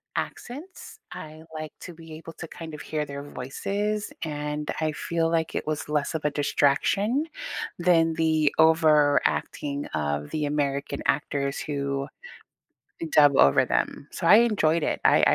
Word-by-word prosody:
accents, 320 - -6
I 155 +1 -9
like 155 -1 -6
to 175 - -8
be 160 -1 -12
able 165 +1 -9
to 165 - -8
kind 160 -1 -9
of 150 - -7
hear 150 -1 -3
their 140 0 -7
voices, 200 +11 -3
and 150 -1 -4
I 155 -1 +1
feel 165 +2 -1
like 165 -1 -1
it - - -3
was 155 -1 -2
less 150 +1 -1
of 155 - -3
a 150 - +2
distraction 195 - +1 0.5
than 165 -2 +3
the 160 -2 +2
over-acting 150 -2 +3
of 75 -1 -2
the 150 -1 -1
American 140 -1 -1
actors 140 -1 0
who 140 -1 -2 1.1
dub 145 -2 +6
over 70 0 +6
them, 60 - -2
so 170 - -3
I 205 - +9
enjoyed 180 -9 +3
it, - - -1
I - - +5
I - - +5
155 Hz, 155 wpm, -26 LUFS, 145-165 Hz, 1.1 s, I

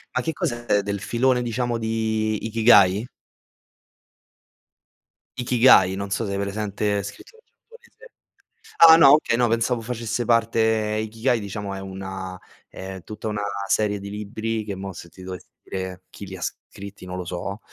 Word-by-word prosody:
ma 125 - +2
che 160 +4 -2
cos'è, 120 -6 0
del 100 0 -3
filone 125 +4 +1
diciamo 120 0 -1
di 110 -1 -1
Ikigai? 110 -2 +5 2.3
Ikigai, 120 -6 +5
non 100 0 -5
so 100 +3 -1
se 100 - -3
hai 100 - -2
presente, 100 0 -1
scrittore 455 - -11
giapponese. 475 +1 -19 0.7
Ah, 165 -1 +10
no, 145 -4 +8
okay, 150 -6 +2
no 120 0 +2
pensavo 115 +1 0
facesse 115 0 -3
parte 115 0 +2 0.4
Ikigai 115 +2 0
diciamo 100 -1 -5
è 95 - -6
una 95 -1 -7 0.3
è 95 0 -8
tutta 105 +5 -8
una 105 -1 -2 0.3
serie 105 -1 +1
di 100 0 -8
libri 110 +2 -4
che 100 -2 -5
mo' 95 0 -6
se 85 0 -11
ti 95 - -15
dovessi 90 -1 -8 0.2
dire 95 -1 -6
chi 100 - -10
li 95 0 -8
scritti, 100 +2 -8
non 90 0 -6
lo 90 - -4
so, 90 +3 -5
105 Hz, 150 wpm, -23 LUFS, 95-115 Hz, 2.3 s, Ah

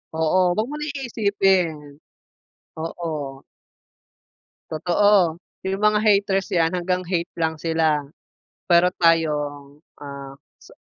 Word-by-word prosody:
Oo, 160 +3 +1
huwag 215 +4 -1
mo 295 - -5
na 300 - -5
iisipin. 200 - +1 1.0
Oo. 155 -4 -5 1.3
Totoo. 175 +1 +2 0.3
'Yung 195 +1 -2
mga 210 0 +4
haters 200 -2 +2
'yan 165 0 +2
hanggang 180 0 -1
hate 175 0 -2
lang 160 -1 0
sila, 160 -2 +1 0.7
pero 175 +1 +5
tayong, 150 -3 +1 0.2
ah 140 -1 -8 0.3
sa - - -16
170 Hz, 105 wpm, -22 LUFS, 160-195 Hz, 1.3 s, pero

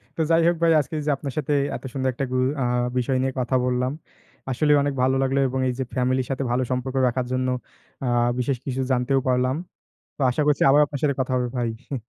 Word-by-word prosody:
তো 165 - -1
যাই 165 0 +5
হোক 175 - +3
ভাই, 165 -1 +4
আজকে 150 - -4
এই - - -4
যে, - - +3
আপনার 140 -2 -6
সাথে 150 0 0 0.2
এত - - -8
সুন্দর 130 -1 0
একটা 135 - -2
গু - - -1 0.3
আ - - +2 0.3
বিষয় 130 +1 +1
নিয়ে 130 0 -1
কথা 125 +1 0
বললাম। 125 +1 0 0.6
আসলেই 150 +3 +3
অনেক 145 -1 -1
ভালো 130 +1 +3
লাগলো 135 +1 +1
এবং 130 +1 -2
এই 125 - 0
যে, - - +1
ফ্যামিলির 130 0 +1
সাথে 135 +1 -1
ভালো 125 +1 +1
সম্পর্ক 130 +1 -2
রাখার 125 +1 -1
জন্য 130 0 0 0.6
আ - - -1 0.3
বিশেষ 125 +1 0
কিছু 130 -1 -2
জানতেও 130 +2 +2
পারলাম। 130 +1 +2 0.6
তো - - -6
আশা 150 - -1
করছি 145 -2 +3
আবার 145 +2 +6
আপনার 140 -1 -6
সাথে 140 -2 +2
কথা 130 - -3
হবে 125 - 0
ভাই, 120 -2 0 0.2
হি। 140 - -4
130 Hz, 230 wpm, -24 LUFS, 125-140 Hz, 0.6 s, আবার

